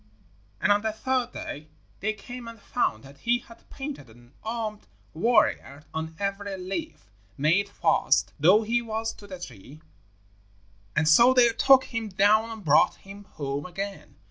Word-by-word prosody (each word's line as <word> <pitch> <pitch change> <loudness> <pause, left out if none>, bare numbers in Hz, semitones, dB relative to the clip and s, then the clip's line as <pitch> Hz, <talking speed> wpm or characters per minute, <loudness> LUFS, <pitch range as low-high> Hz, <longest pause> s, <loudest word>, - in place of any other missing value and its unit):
And - - +2
on 205 0 +4
the 220 0 -1
third 255 +3 -1
day 150 +2 -7 0.3
they 215 +3 -1
came 240 +3 -9
and 230 -1 -10
found 155 - -1
that 140 +1 -15
he 235 +1 +2
had 230 -1 -17
painted 275 - -7
an 120 +3 -19
armed 220 -2 -4 0.3
warrior 155 - +1
on 160 0 -4
every 200 0 -3
leaf, 180 - -6 0.3
made 170 +8 +2
fast - - +2
though 185 +9 +5
he 235 +2 +1
was 225 -1 -3
to 205 - -14
the 185 -2 -8
tree, 145 - -11 1.2
and 155 +1 +2
so 235 +11 +6
they 245 -2 +6
took 260 +3 +5
him 225 -2 -4
down 210 +4 +3
and 220 -4 -9
brought 150 0 +4
him 200 +1 -13
home 140 -2 -5
again. 195 +3 -7
205 Hz, 160 wpm, -26 LUFS, 160-230 Hz, 1.2 s, so